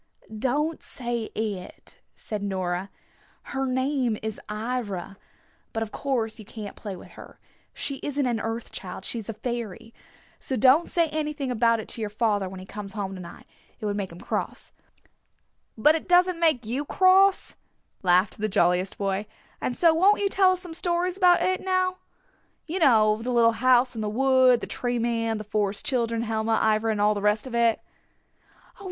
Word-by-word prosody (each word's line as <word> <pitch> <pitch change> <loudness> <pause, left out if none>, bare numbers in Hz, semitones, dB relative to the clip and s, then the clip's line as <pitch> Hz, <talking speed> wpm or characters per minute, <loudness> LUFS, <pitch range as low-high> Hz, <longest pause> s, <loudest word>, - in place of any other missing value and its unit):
"Don't 290 +8 -1
say 240 -2 -3
'It,'" 205 -4 -5 0.2
said 210 -2 -5
Nora. 185 -1 -2 0.6
"Her 270 0 -1
name 260 -3 0
is 220 -1 -4
'Ivra.' 210 -4 -4 0.6
But 225 - -1
of 215 - -8
course 240 -6 -2
you - - -8
can't 210 0 -8
play 205 -3 -6
with - - -13
her. - - -13 0.3
She 275 - -4
isn't 285 -1 -1
an 240 -3 0
Earth 225 +1 -4
Child. 190 0 -7
She's 225 -3 -4
a - - -2
fairy. 230 -1 -5 0.5
So 265 - -3
don't 265 +8 +4
say 335 -2 +2
anything 300 -3 -3
about 230 -1 +3
it 220 - -7
to 230 - -4
your 215 - -2
father 205 -3 0
when 190 0 -9
he 185 - -9
comes 200 0 -8
home 200 -3 -4
to 185 - -8
night. 170 - -11 0.3
It - - -6
would 205 -1 -1
make 195 -3 -3
him 170 - -11
cross." - - -4 1.1
"But 300 +8 +5
it 320 - -3
doesn't 360 -1 +4
make 310 -8 +2
you 250 +6 -2
cross," 380 +4 +4 0.5
laughed 185 +2 +2
the 215 +1 -1
jolliest 180 +2 +1
boy. 200 +1 -2 0.3
"And 245 - -2
so 335 -2 +5
won't 385 +6 +4
you 405 -1 +1
tell 380 -1 +4
us 365 - -5
some 350 -3 -8
stories 350 +1 -1
about 360 -2 +4
it 370 0 0
now. 370 0 0 0.7
You 340 +4 -3
know, 220 -7 +4
the 250 +2 -3
little 235 -1 +5
house 250 +1 +3
in 225 - -5
the 210 - -1
wood, 255 +1 +4
the - - -3
Tree 245 -1 -2
Man, 230 -1 0
the 215 - -6
Forest 210 +2 -1
Children, 230 -5 0
Helma, 220 0 0 0.2
Ivra 220 +1 0
and 215 - -2
all 210 +1 +4
the 205 - -4
rest 210 +2 +1
of 255 - -8
it." 235 -1 +3
230 Hz, 185 wpm, -26 LUFS, 210-280 Hz, 1.1 s, But